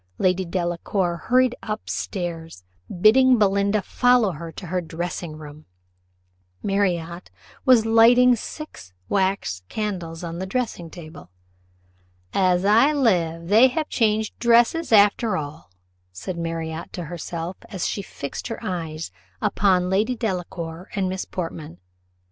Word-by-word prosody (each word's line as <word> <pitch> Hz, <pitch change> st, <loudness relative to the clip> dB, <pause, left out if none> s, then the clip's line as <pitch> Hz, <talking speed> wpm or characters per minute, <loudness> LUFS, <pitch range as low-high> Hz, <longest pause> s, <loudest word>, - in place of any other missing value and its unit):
Lady 185 Hz, 0 st, +2 dB
Delacour 175 Hz, +1 st, -1 dB
hurried 255 Hz, 0 st, +3 dB
up 215 Hz, 0 st, -5 dB
stairs, 165 Hz, -, -5 dB, 0.4 s
bidding 255 Hz, +4 st, +6 dB
Belinda 200 Hz, 0 st, +2 dB
follow 245 Hz, -5 st, +3 dB
her 165 Hz, 0 st, -8 dB
to 190 Hz, -, -8 dB
her 180 Hz, +1 st, -1 dB
dressing 170 Hz, -1 st, -5 dB
room. 150 Hz, 0 st, -12 dB, 1.0 s
Marriott 180 Hz, -4 st, -1 dB, 0.4 s
was 250 Hz, -4 st, +6 dB
lighting 235 Hz, +3 st, +6 dB
the 245 Hz, -, +3 dB
six 220 Hz, -, -9 dB, 0.2 s
wax 190 Hz, -, 0 dB
candles 180 Hz, -6 st, -4 dB
on 170 Hz, 0 st, -5 dB
the 190 Hz, -, -4 dB
dressing 195 Hz, -6 st, -3 dB
table. 160 Hz, -, -11 dB, 1.0 s
"As 185 Hz, -1 st, +2 dB
I 230 Hz, +8 st, +5 dB
live, 170 Hz, -, +1 dB
they 225 Hz, +5 st, +7 dB
have 305 Hz, +4 st, -3 dB
changed 220 Hz, -2 st, 0 dB
dresses 235 Hz, +7 st, +3 dB
after 205 Hz, -1 st, +4 dB
all," 150 Hz, -, -7 dB, 0.4 s
said 135 Hz, -, -6 dB
Marriott 165 Hz, -1 st, -4 dB
to 175 Hz, -, -5 dB
herself, 170 Hz, +2 st, -5 dB
as 190 Hz, -4 st, -3 dB
she 200 Hz, -, -3 dB
fixed 140 Hz, -7 st, -7 dB
her 230 Hz, -, -5 dB
eyes 165 Hz, -, -4 dB, 0.3 s
upon 185 Hz, -2 st, +2 dB
Lady 215 Hz, +6 st, +1 dB
Delacour 180 Hz, -5 st, -4 dB
and 190 Hz, -2 st, 0 dB
Miss 190 Hz, 0 st, -3 dB
Portman. 165 Hz, -, -6 dB
185 Hz, 130 wpm, -23 LUFS, 165-220 Hz, 1.0 s, they